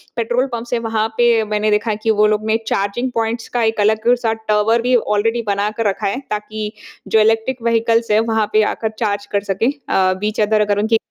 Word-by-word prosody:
Petrol 240 Hz, +2 st, 0 dB
pumps 235 Hz, +1 st, -5 dB
हैं। 240 Hz, -, +1 dB
वहाँ 220 Hz, -1 st, -1 dB
पे 235 Hz, -2 st, +3 dB
मैंने 210 Hz, 0 st, +1 dB
देखा 210 Hz, +2 st, +1 dB
है 210 Hz, -, -2 dB
कि 225 Hz, -, +3 dB
वो 210 Hz, -, +6 dB
लोग 215 Hz, 0 st, 0 dB
ने 220 Hz, +1 st, +2 dB
चार्जिंग 205 Hz, +6 st, -1 dB
पॉइंट्स 225 Hz, 0 st, -2 dB
का 240 Hz, -1 st, +1 dB
एक 220 Hz, -1 st, 0 dB
अलग-सा 225 Hz, +2 st, +2 dB
टावर 215 Hz, +2 st, +2 dB
भी 250 Hz, +1 st, +2 dB
ऑलरेडी 225 Hz, +1 st, +1 dB
बना 200 Hz, +1 st, 0 dB
कर 230 Hz, -2 st, 0 dB
रखा 195 Hz, -, -1 dB
है, 200 Hz, +6 st, -2 dB
ताकि 210 Hz, 0 st, -4 dB, 0.4 s
जो 220 Hz, -, +3 dB
इलेक्ट्रिक 225 Hz, +3 st, +1 dB
व्हीकल्स 230 Hz, 0 st, +1 dB
हैं, 210 Hz, -, +4 dB
वहाँ 220 Hz, -1 st, +1 dB
पे 215 Hz, 0 st, +4 dB
आकर 220 Hz, -, -3 dB
चार्ज 205 Hz, -2 st, -1 dB
कर 200 Hz, -1 st, 0 dB
सकें। 205 Hz, +5 st, 0 dB, 0.2 s
अ, 185 Hz, -1 st, +2 dB
बीच 215 Hz, +2 st, -2 dB
अदर 215 Hz, 0 st, +2 dB
अगर 205 Hz, -1 st, +1 dB
उनकी 220 Hz, +2 st, +2 dB
220 Hz, 215 wpm, -18 LUFS, 210-230 Hz, 0.4 s, वो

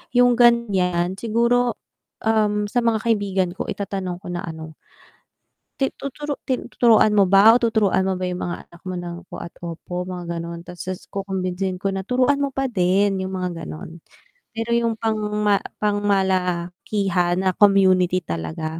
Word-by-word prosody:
yung 245 Hz, 0 st, +5 dB
ganyan 190 Hz, -7 st, +3 dB
siguro, 235 Hz, +1 st, +1 dB, 0.5 s
um, 210 Hz, -2 st, +1 dB
sa 245 Hz, -, +1 dB
mga 230 Hz, -2 st, +1 dB
kaibigan 200 Hz, -5 st, +1 dB
ko 185 Hz, -, -5 dB
itatanong 190 Hz, -3 st, -4 dB
ko -, -, -10 dB
na 175 Hz, -, -4 dB
ano 160 Hz, -1 st, -8 dB, 1.0 s
Ti 270 Hz, -, +3 dB, 0.2 s
tuturu 290 Hz, +2 st, -4 dB
ti 260 Hz, -, +2 dB, 0.2 s
tuturuan 225 Hz, -3 st, +5 dB
mo 200 Hz, -, +7 dB
ba 205 Hz, +3 st, +8 dB
o 245 Hz, -, +3 dB
tuturuan 220 Hz, -5 st, +2 dB
mo 190 Hz, -, +1 dB
ba 185 Hz, -, -3 dB
yung 180 Hz, -, -4 dB
mga 175 Hz, -, -3 dB
anak 170 Hz, -, -18 dB
mo -, -, -3 dB
ng 175 Hz, -1 st, -6 dB
po -, -, -8 dB
at 170 Hz, -, -11 dB
opo 170 Hz, +1 st, -7 dB, 0.2 s
mga 180 Hz, -1 st, -5 dB, 0.2 s
ganon 170 Hz, 0 st, -6 dB
tapos 180 Hz, +1 st, -7 dB
kukumbinsihin 190 Hz, -1 st, -2 dB
ko 195 Hz, -, -3 dB
na, 195 Hz, -, -2 dB
"Turuan 260 Hz, +3 st, +2 dB
mo 280 Hz, -, +1 dB
pa 270 Hz, 0 st, -2 dB
din.", 195 Hz, -3 st, +2 dB
yung 190 Hz, 0 st, -4 dB
mga 180 Hz, 0 st, -2 dB
ganon, 75 Hz, 0 st, -7 dB, 0.7 s
pero 225 Hz, +1 st, -3 dB
yung 235 Hz, -1 st, +1 dB
pang 220 Hz, -1 st, -1 dB, 0.3 s
ma 200 Hz, -1 st, +4 dB, 0.2 s
pang 205 Hz, -1 st, +2 dB
malakihan 180 Hz, -1 st, 0 dB
na 185 Hz, -, +3 dB
community 185 Hz, -3 st, +4 dB
talaga 155 Hz, -, -4 dB
195 Hz, 165 wpm, -22 LUFS, 180-225 Hz, 1.0 s, ba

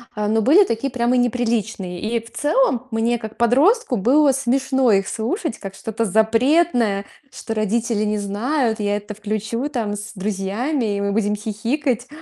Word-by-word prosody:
а, 210 Hz, 0 st, -1 dB
но 220 Hz, +1 st, +2 dB
были 320 Hz, -, +6 dB
такие 230 Hz, +2 st, -2 dB
прямо 245 Hz, +1 st, +1 dB
неприличные. 225 Hz, -7 st, -1 dB
И 230 Hz, +2 st, -1 dB
в 230 Hz, +1 st, -15 dB
целом 290 Hz, -, +1 dB
мне, 230 Hz, +2 st, 0 dB
как 220 Hz, 0 st, -8 dB
подростку, 270 Hz, -, +3 dB
было 275 Hz, +8 st, +4 dB
смешно 265 Hz, -1 st, +1 dB
их 195 Hz, -1 st, +2 dB
слушать 235 Hz, -, -3 dB
как 195 Hz, -1 st, -8 dB
что-то 225 Hz, +2 st, -3 dB
запретное, 225 Hz, -, +2 dB, 0.3 s
что 225 Hz, -3 st, -6 dB
родители 220 Hz, +1 st, 0 dB
не 210 Hz, 0 st, 0 dB
знают, 220 Hz, +4 st, -1 dB
я 205 Hz, 0 st, 0 dB
это 210 Hz, 0 st, -7 dB
включу 215 Hz, +5 st, -3 dB
там 225 Hz, -7 st, -2 dB
с 210 Hz, +2 st, -8 dB
друзьями, 210 Hz, +5 st, -2 dB
и 200 Hz, -, -2 dB
мы 200 Hz, -, 0 dB
будем 210 Hz, 0 st, 0 dB
хихикать. 235 Hz, +4 st, -2 dB
225 Hz, 160 wpm, -21 LUFS, 210-255 Hz, 0.3 s, были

